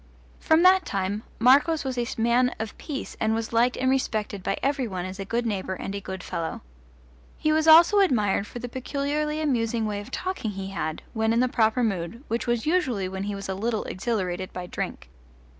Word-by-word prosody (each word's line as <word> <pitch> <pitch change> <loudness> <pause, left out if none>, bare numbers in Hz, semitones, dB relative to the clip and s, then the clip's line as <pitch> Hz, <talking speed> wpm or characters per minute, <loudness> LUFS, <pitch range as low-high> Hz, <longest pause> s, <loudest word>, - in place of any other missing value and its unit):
From 320 +2 +3
that 370 0 +6
time 200 +2 -2 0.2
Marcos 280 +7 +4
was 265 -2 -3
a 240 -1 -1
man 240 +2 +3
of 220 -1 -4
peace 285 -4 -5
and 220 0 +1
was 225 0 -3
liked 240 +2 +3
and 260 - 0
respected 215 -6 0
by - - -1
every 275 -2 +1
one 185 -3 -4
as 185 +1 -7
a 195 - -4
good 235 +4 -1
neighbour 190 -4 -2
and 195 - -5
a 200 - -4
good 190 -1 -6
fellow. 165 -1 -4 0.8
He 310 - +1
was 315 +1 +2
also 335 +6 +8
admired 210 - +2
for - - -8
the 245 +1 -5
peculiarly 285 +4 -2
amusing 235 -6 0
way 205 -1 -2
of 205 - -11
talking 365 - -3
he 195 0 -5
had, 160 -5 -3
when 220 -1 +1
in 230 - +2
the 255 - +3
proper 230 0 +2
mood, 205 +3 -2
which 230 +2 -2
was 240 -1 0
usually 260 - +1
when 190 +1 -4
he 205 0 -3
was 195 0 -6
a 190 - -2
little 220 +3 -1
exhilarated 185 -3 -3
by 180 -1 -6
drink. - - -5
230 Hz, 210 wpm, -26 LUFS, 195-265 Hz, 0.8 s, also